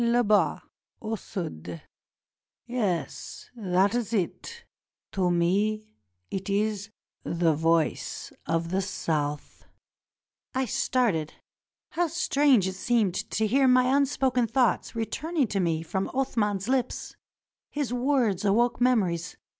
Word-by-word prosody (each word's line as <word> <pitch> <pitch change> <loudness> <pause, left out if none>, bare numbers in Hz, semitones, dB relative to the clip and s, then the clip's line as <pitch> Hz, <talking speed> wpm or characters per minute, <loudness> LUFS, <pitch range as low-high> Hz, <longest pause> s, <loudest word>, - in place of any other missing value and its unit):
Id 235 0 +2
has, 205 -9 +3 0.4
au 225 0 -3
sud. 85 - -6 0.9
Yes, 210 -10 -3
that 195 -2 +2
is 240 -2 -1
it; 465 - -3 0.5
to 185 -2 +1
me 205 +5 +1 0.4
it 195 +1 -4
is 205 0 0 0.3
the 170 -1 +1
Voice 165 +1 0
of 165 +1 -1
the 190 +1 +1
South." 150 -6 -3 0.9
I 260 0 +1
started. 210 - 0 0.6
How 345 0 +1
strange 285 - +3
it 190 - -2
seemed 210 -1 +1
to 220 +4 -1
hear 265 +5 +3
my 255 +1 +4
unspoken 265 -3 +2
thoughts 245 -1 +1
returning 295 +7 -1
to 200 - -1
me 165 -3 0
from 190 +4 -2
Athman's 210 -7 0
lips. 255 -1 -1 0.5
His 285 -4 -2
words 245 -7 +1
awoke 235 +5 +2
memories. 185 -9 +1
215 Hz, 115 wpm, -27 LUFS, 180-250 Hz, 0.9 s, my